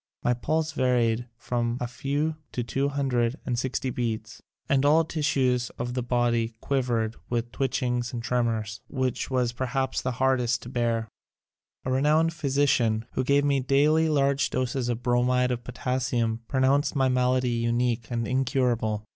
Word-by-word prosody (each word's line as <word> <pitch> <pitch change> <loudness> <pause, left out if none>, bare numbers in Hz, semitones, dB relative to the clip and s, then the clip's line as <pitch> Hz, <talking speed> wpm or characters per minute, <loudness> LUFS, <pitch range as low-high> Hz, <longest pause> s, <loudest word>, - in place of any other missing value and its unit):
My 125 - +3
pulse 155 +6 -1
varied 120 -4 +1
from 120 0 -1
a 125 - -1
few 145 +5 -2 0.2
to 120 - -1
two 135 +4 -1
hundred 130 -4 0
and 120 -2 -1
sixty 130 0 -2
beats 110 -3 -4 0.3
and 135 -1 +2
all 155 +3 +5
the 160 - -13
tissues 130 -6 +1
of 120 +1 -3
the 125 - -1
body 120 -2 0 0.7
with 120 0 -2
twitch 135 -1 -1
ings 125 -1 -1
and 120 -2 -5
tremors 115 -3 -1
which 130 -2 -2
was 125 -2 +1
perhaps 130 +2 -2
the 125 - -2
hardest 125 -1 +1
to 120 - -8
bear. 115 -2 0 0.8
A 130 - -1
renowned 155 +5 +3
physician 135 -7 +1
who 130 - -1
gave 140 +2 +3
me 140 -1 +2
daily 150 +5 +3
large 140 -2 +2
doses 130 -1 -1
of 120 0 -2
Bromid 125 +1 +2
of 120 -1 -3
Potassium 125 -2 -1
pronounced 135 +3 +2
my 135 -1 +3
malady 125 0 +2
unique 120 0 0
and 115 -2 -2
incurable. 125 -5 0
125 Hz, 155 wpm, -26 LUFS, 120-135 Hz, 0.8 s, all